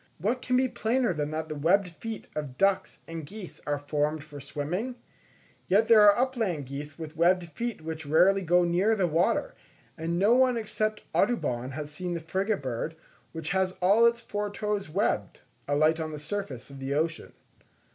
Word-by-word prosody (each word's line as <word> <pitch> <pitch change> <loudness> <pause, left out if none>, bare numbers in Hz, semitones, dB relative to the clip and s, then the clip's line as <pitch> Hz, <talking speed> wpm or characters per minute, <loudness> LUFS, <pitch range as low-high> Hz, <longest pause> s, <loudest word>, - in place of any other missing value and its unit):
What 225 +9 -1
can 250 0 +1
be 260 0 +3
plainer 235 -2 0
than 150 -2 -2
that 155 +1 -3
the 155 - -4
webbed 180 +6 +2
feet 220 +6 -7
of 145 -4 -5
ducks 195 0 +1
and 165 -1 -6
geese 190 +5 -9
are 145 0 +1
formed 150 +1 -1
for 150 -2 -10
swimming? 165 - -3 0.7
Yet 210 +4 +4
there 225 -2 +8
are 205 -1 +7
upland 225 - 0
geese 140 +3 -7
with 160 -1 -7
webbed 175 +2 +3
feet 235 +4 -4
which 160 -1 -6
rarely 185 +6 +5
go 175 0 +3
near 180 +6 +2
the 195 -4 +1
water; 175 - +1 0.4
and 165 +1 -2
no 205 +5 +4
one 255 -1 +4
except 215 -1 -2
Audubon, 130 - 0
has 150 +1 -5
seen 175 +3 -4
the - - -2
frigate 190 +3 -1
bird, 130 +5 -3 0.4
which 160 0 -4
has 190 0 +1
all 205 +6 +5
its 235 0 0
four 205 -2 -3
toes 205 -3 -3
webbed, 150 - -1 0.3
alight 155 +3 +3
on 160 -1 -3
the 150 - -5
surface 150 -5 -5
of 135 - -10
the 135 +1 -2
ocean. 160 +1 -2
175 Hz, 185 wpm, -28 LUFS, 150-210 Hz, 0.7 s, there